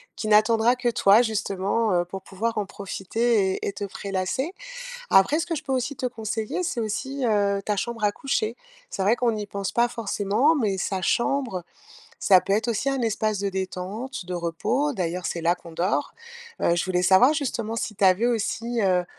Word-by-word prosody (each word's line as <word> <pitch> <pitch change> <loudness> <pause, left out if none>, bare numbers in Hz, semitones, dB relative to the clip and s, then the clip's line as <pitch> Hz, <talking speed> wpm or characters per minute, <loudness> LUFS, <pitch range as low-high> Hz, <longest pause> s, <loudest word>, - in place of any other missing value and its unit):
qui 215 - -4
n'attendra 220 +3 +4
que 250 -1 0
toi 210 -1 +5
justement, 210 -1 0
heu, 175 -1 +3
pour 190 +2 -8
pouvoir 225 +5 -3
en 210 - 0
profiter 200 +1 0
et - - -4
et 200 - -2
te 200 - -6
prélasser. 200 - -3 0.6
Après 195 +11 +5
ce 335 - -1
que 345 - -3
je 310 - -4
peux 265 - -2
aussi 260 +2 -2
te 260 - -3
conseiller, 225 - -3
c'est 285 - -2
aussi, 260 +5 -2
heu, 200 -3 +2
ta 210 +1 -1
chambre 230 +2 -2
à 205 - +2
coucher. 230 -4 -1 0.3
C'est 195 - -4
vrai 215 +5 +3
qu'on 240 -2 +1
n'y 210 -1 -4
pense 200 -1 -4
pas 240 0 +3
forcément 230 +5 +1
mais 210 -9 0
sa 190 +1 -2
chambre, 235 -2 0 0.6
ça 190 -2 +6
peut 195 - -1
être 220 +4 +1
aussi 235 +2 -1
un 270 -1 0
espace 215 -2 0
de 200 0 -1
détente, 190 +4 -5
de 180 - -4
repos. 175 - -1
D'ailleurs, 180 -3 -3
c'est 170 - -3
là 170 +1 +2
qu'on 170 - -13
dort. 175 +5 -1 0.5
Heu, 170 - +3
je 175 - 0
voulais 180 -1 0
savoir, 190 - +6
justement, 235 -7 -2
si 225 -1 -3
tu 200 - -2
avais 190 +5 +4
aussi, 235 +1 -1
heu, 180 -2 +2
215 Hz, 200 wpm, -25 LUFS, 190-240 Hz, 0.6 s, ça